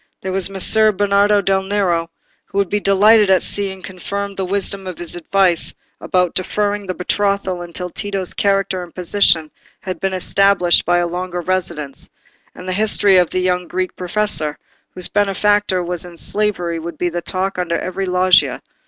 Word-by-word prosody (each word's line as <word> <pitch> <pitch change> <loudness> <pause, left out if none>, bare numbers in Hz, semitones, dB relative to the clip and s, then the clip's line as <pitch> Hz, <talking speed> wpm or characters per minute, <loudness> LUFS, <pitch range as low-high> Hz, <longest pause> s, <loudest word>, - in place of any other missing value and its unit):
There 190 - -4
was 190 0 +2
Messer 215 +3 +3
Bernardo 205 +1 +2
del 195 0 +1
Nero, 190 -4 0 0.4
who - - -8
would 200 -2 +1
be 205 - +1
delighted 205 +1 +4
at 190 -2 +4
seeing 190 -2 -3
confirmed 200 +3 -5
the 190 - -3
wisdom 195 0 -2
of 185 - -6
his 175 0 -4
advice 175 0 +1 0.2
about 180 -2 0
deferring 205 +2 -1
the 185 - -3
betrothal 195 -1 -1
until 175 +1 -6
Tito's 195 -2 -3
character 195 -2 0
and 175 -1 -11
position 175 -3 +2 0.3
had 185 -4 -5
been 195 0 -1
established 190 -1 +3
by 175 0 +2
a 175 0 +1
longer 180 +1 -4
residence; 170 -6 -2 0.5
and 180 - -10
the 185 - -1
history 205 -1 +3
of 180 -2 +3
the 185 - -1
young 180 -1 0
Greek 185 +1 -3
professor, 180 -5 -1 0.4
whose 180 - -1
benefactor 205 -1 +1
was 175 -1 -3
in 175 -1 -10
slavery, 180 -4 -1
would 170 +1 -7
be 175 - -1
the 175 0 -4
talk 190 +2 -2
under 170 -2 -1
every 190 +2 -4
loggia. 180 0 +3
185 Hz, 170 wpm, -18 LUFS, 175-200 Hz, 0.5 s, delighted